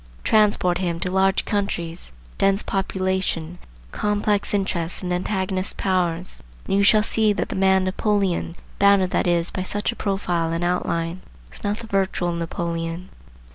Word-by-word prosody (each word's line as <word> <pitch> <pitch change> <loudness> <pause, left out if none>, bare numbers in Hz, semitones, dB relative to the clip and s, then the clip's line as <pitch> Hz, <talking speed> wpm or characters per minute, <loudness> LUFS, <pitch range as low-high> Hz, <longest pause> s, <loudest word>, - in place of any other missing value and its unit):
Transport 205 -5 +3
him 170 -2 -1
to 180 - -1
large 190 0 +2
countries, 180 -5 -2 0.3
dense 195 +1 +3
population, 185 -3 -1 0.3
complex 210 0 0
interests 185 -4 -1
and 180 -1 -1
antagonist 190 +1 -1
power, 180 -3 +1
and 180 +3 -9 0.4
you 195 - +2
shall 210 +1 +5
see 220 -1 +3
that 205 - -2
the - - -4
man 190 0 +3
Napoleon, 190 -3 0 0.2
bounded 200 -2 +4
that - - +1
is 170 0 +1
by 185 - -3
such 205 +4 -2
a - - -9
profile 175 -6 -1
and 165 +1 -1
outline, 175 0 -1 0.3
is - - -8
not 205 +1 -1
the 230 - -8
virtual 190 -4 0
Napoleon. 170 +1 -3
185 Hz, 150 wpm, -23 LUFS, 175-200 Hz, 0.4 s, shall